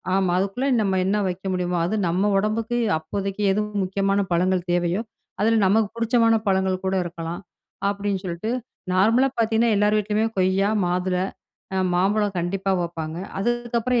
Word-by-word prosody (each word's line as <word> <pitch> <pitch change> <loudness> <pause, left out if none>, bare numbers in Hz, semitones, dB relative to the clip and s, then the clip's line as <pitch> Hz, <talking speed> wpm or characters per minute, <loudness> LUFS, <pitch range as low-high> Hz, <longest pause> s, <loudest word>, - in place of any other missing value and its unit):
ஆமா. 190 -2 +2
அதுக்குள்ள 200 +8 -1
நம்ம 195 -2 +1
என்ன 205 +2 +1
வெக்க 185 +2 -5
முடியுமோ. 180 -1 -1
அது 200 - -1
நம்ம 185 +5 +1
உடம்புக்கு 220 +3 0 0.2
அப்போதைக்கு 195 +5 -4
எது 210 - +1 0.2
முக்கியமான 195 +1 0
பழங்கள் 180 +1 +1
தேவையோ, 175 +3 +1 0.4
அதில 225 +1 +3
நமக்கு 215 +1 +3
புடிச்சமான 230 0 +3
பழங்கள் 190 -1 +1
கூட 190 - 0
இருக்கலாம், 165 0 -5 0.5
அப்படின்னு 200 -1 -2
சொல்லிட்டு, 180 +6 -3 0.4
நார்மலா 225 +8 +4
பாத்தீங்கன்னா 225 0 +2
எல்லார் 210 +1 +3
வீட்லயுமே 210 +1 +1
கொய்யா, 190 +2 +2 0.2
மாதுளை, 180 +1 0 0.5
அ - - +1 0.2
மாம்பழம் 200 +2 +1
கண்டிப்பா 195 +3 -1
வெப்பாங்க. 165 -2 -5 0.2
அதுக்கப்புறம் 240 +2 0
195 Hz, 140 wpm, -23 LUFS, 185-215 Hz, 0.5 s, நார்மலா